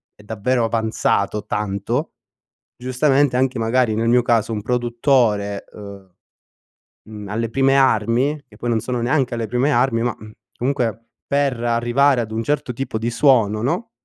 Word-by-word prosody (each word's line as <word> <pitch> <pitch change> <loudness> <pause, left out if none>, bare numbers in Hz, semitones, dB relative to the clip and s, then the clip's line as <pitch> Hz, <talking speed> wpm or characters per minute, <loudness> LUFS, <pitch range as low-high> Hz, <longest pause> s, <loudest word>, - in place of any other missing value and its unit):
è - - -18
davvero 115 +4 -1
avanzato 110 -2 0
tanto. 105 +7 -2 0.7
Giustamente 135 +1 +1
anche 130 -1 0
magari 115 0 +1
nel 115 +1 0
mio 125 +1 +4
caso 115 -2 +1
un 105 - -3
produttore, 120 -4 0
uhm, 100 -3 -12 1.0
mhmm, 105 -2 -8
alle 115 +3 -2
prime 135 +2 +2
armi, 130 +3 +2
che - - -19
poi 120 - -4
non 115 -1 +1
sono 125 +1 -3
neanche 130 0 0
alle 115 -2 -3
prime 125 +6 0
armi 125 -5 +2
ma, 120 0 -1
mhmm, 110 0 -12 0.3
comunque 120 -3 -2 0.2
per 140 -4 0
arrivare 120 +3 +2
ad 110 -1 -6
un 110 +1 -2
certo 145 0 -1
tipo 125 -2 -4
di 115 +2 -2
suono, 115 -6 +3
no, 180 - -2
120 Hz, 160 wpm, -20 LUFS, 110-130 Hz, 1.0 s, mio